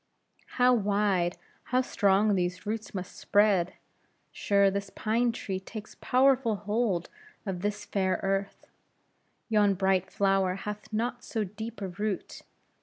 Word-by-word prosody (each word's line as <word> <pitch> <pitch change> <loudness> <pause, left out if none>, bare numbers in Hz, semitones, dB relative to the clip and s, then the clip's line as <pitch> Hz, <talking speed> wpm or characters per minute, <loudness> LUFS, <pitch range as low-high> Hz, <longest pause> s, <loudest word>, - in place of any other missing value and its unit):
"How 250 0 +6
wide, 200 -5 +1 0.3
how 255 +1 +2
strong 205 -3 +3
these 180 0 -1
roots 215 0 -4
must 185 -1 -5
spread! 200 -4 +3 0.6
Sure, 200 -1 +3
this 200 0 -3
pine 230 +4 +1
tree 195 -4 -4
takes 215 +3 -9
powerful 255 -3 +3
hold 205 -3 -1 0.3
of 185 -3 -3
this 205 +1 -2
fair 190 -2 0
earth! 195 0 -2 0.8
Yon 210 -3 +3
bright 190 0 +1
flower 195 -2 +2
hath 210 +3 -7
not 240 +3 -2
so 220 - -2
deep 220 +3 -7
a - - -2
root. 205 +2 -4
205 Hz, 130 wpm, -29 LUFS, 190-220 Hz, 0.8 s, How